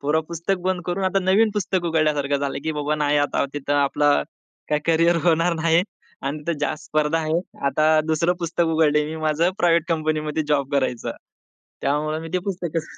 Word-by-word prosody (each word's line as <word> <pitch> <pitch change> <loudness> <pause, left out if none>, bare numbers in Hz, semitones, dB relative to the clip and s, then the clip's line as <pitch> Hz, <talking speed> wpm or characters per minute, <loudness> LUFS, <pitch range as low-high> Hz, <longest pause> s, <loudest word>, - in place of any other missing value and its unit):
पुरं 150 +3 +1
पुस्तक 170 +3 -2
बंद 185 -1 0
करून 180 +2 -1
आता 190 +1 +2
नवीन 205 +4 +4
पुस्तक 190 -3 -1
उघडल्यासारखं 150 -3 +1
झालं, 140 -1 -3
की 160 - -1
बाबा 150 0 -1
नाही 150 -1 +1
आता 145 -1 +1
तिथं 145 0 -3
आपलं 145 - +2 0.5
काय 150 - +2
करियर 165 +1 +3
होणार 170 0 +3
नाही 165 +1 +2 0.4
अन् 140 +3 -3
तिथं 170 -3 -1
जास्त 155 +1 -2
स्पर्धा 155 +1 0
आहे. 160 +1 0 0.3
आता 155 +3 +2 0.2
दुसरं 170 +3 +2
पुस्तक 170 +1 0
उघडलंय 150 -1 +3
मी 160 +1 -5
माझं 155 +3 +2
प्रायव्हेट 170 -2 +3
कंपनी 155 -1 0
मध्ये 155 +1 -1
जॉब 140 -2 0
करायचं. 130 -4 -1 0.7
त्यामुळे 150 +2 0
मी 165 - -7
ते 185 - +2
पुस्तकच 170 -4 -3
155 Hz, 180 wpm, -22 LUFS, 150-170 Hz, 0.7 s, नवीन